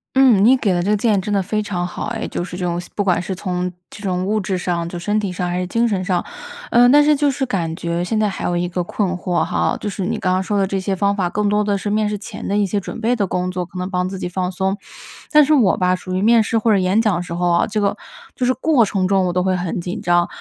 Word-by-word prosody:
嗯， 255 -7 +5
你 255 +5 +6
给 205 -6 +1
的 175 -1 0
这 200 - 0
个 210 - +3
建 210 0 +2
议 - - 0
真 205 +2 -3
的 200 - +2
非 210 +3 -2
常 180 -4 -2
好 175 - -5
哎， 225 0 -3
就 - - -3
是 175 0 -7
这 180 - -3
种 175 0 -1
不 - - 0
管 180 -3 +1
是 185 +2 -4
从 180 -1 -3 0.2
这 205 - -12
种 185 -2 -1
物 215 +2 0
质 190 -1 -2
上， 175 -2 -2
就 175 - -6
身 205 +5 -1
体 200 -3 -3
上 180 0 -3
还 175 - -2
是 180 - -1
精 230 +6 +1
神 195 -4 -1
上。 180 -2 0 0.5
呃， 245 +1 +5
但 290 +3 +7
是 300 0 +4
就 285 0 +2
是 265 +1 -2
感 175 -9 -2
觉 170 0 -2
现 215 +4 -1
在 215 - +2
还 195 - -5
有 175 - 0
一 175 +1 0
个 175 0 -2
困 190 +1 -1
惑 180 -2 -1
哈， 180 - 0
就 210 - -3
是 195 -2 -4
你 225 +4 -1
刚 185 -1 +1
刚 185 +1 +1
说 205 +1 -1
的 195 - +2
这 195 - -2
些 195 +1 -2
方 200 +1 +1
法， 185 -3 0
更 210 +3 -1
多 210 +1 +2
的 205 -1 0
是 205 - -4
面 210 0 +1
试 210 - -2
前 205 - -8
的 200 - 0
一 205 - +2
些 200 +2 -2
准 200 - -5
备 235 +2 +1
的 210 -4 0
工 180 0 -2
作， 180 -1 -3
可 180 +1 -9
能 180 +1 -3
帮 180 -1 -1
自 190 0 -6
己 - - -3
放 180 0 -2
松。 190 +2 -1 0.5
但 300 -1 +6
是 310 - +3
我 235 -10 +4
吧， 180 0 +2
属 185 0 -7
于 185 - 0
面 225 +2 +5
试 225 - 0
或 225 0 +3
者 - - +4
演 190 +3 +2
讲 215 -5 +1
的 175 - -2
时 175 - -7
候 175 +1 0
啊， 170 0 +3
这 215 0 -2
个 200 -1 +1 0.4
就 255 - -1
是 255 - +3
过 270 -1 +3
程 195 -3 0
中 190 -1 +2
我 180 - 0
都 180 - 0
会 185 0 +1
很 180 0 -3
紧 175 +1 -5
张， 175 0 +2
190 Hz, 335 characters per minute, -19 LUFS, 180-210 Hz, 0.5 s, 但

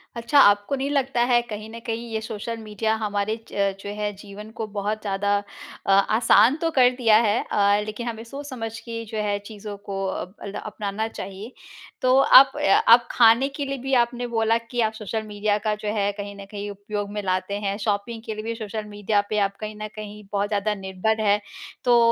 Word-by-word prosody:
अच्छा 235 +5 +3
आपको 205 +2 +5
नहीं 275 +1 -2
लगता 270 -4 0
है 240 -1 +5
कहीं 215 -2 -7
न 230 +1 -8
कहीं 230 0 -4
ये 220 - 0
सोशल 225 +1 -5
मीडिया 220 +1 -1
हमारे 205 +1 -1 0.2
ज 200 -1 +1
जो 200 - -7
है 210 0 -1
जीवन 205 +1 -10
को 220 - -1
बहुत 210 +2 -2
ज़्यादा 200 0 -1 0.5
अ, 195 - +2
आसान 220 +6 +5
तो 330 - +1
कर 255 -4 +5
दिया 220 -3 +6
है 215 0 +2
अ, 205 0 +3
लेकिन 215 +3 -5
हमें 225 -1 -5
सोच-समझ 235 -3 -6
के 230 -1 -6
जो 220 - -4
है 205 -1 0
चीज़ो 210 -1 -8
को 195 -1 -3
अब 190 +1 -5
अल्दा 200 -1 -5
अपनाना 210 +1 -3
चाहिए। 200 +1 -8 0.5
तो 255 0 +4 0.3
आप 270 - +1
अ, - - -3 0.3
आप 235 +1 +7
खाने 235 +3 +5
के 285 - -2
लिए 275 0 -3
भी 270 - 0
आपने 245 +1 -5
बोला 225 +1 +3
कि 245 -1 -1
आप 220 - -15
सोशल 220 +1 -4
मीडिया 210 0 0
का 215 -1 +1
जो 210 0 -2
है 200 0 +1
कहीं 200 0 -6
न - - -9
कहीं 205 0 -5
उपयोग 205 0 -5
में 210 0 -3
लाते 185 +1 -1
हैं, 200 -1 -2
शॉपिंग 215 +2 -2
के 220 - -3
लिए 215 - -6
भी 230 0 -3
सोशल 215 -1 -5
मीडिया 205 0 +1
पे 215 - -1
आप 195 - -19
कहीं 215 0 -6
न 215 - -3
कहीं 210 0 -8
बहुत 200 0 +1
ज़्यादा 210 0 0
निर्भर 220 +4 0
हैं। 205 0 +3 0.5
तो 240 -1 +6
215 Hz, 210 wpm, -24 LUFS, 205-230 Hz, 0.5 s, आप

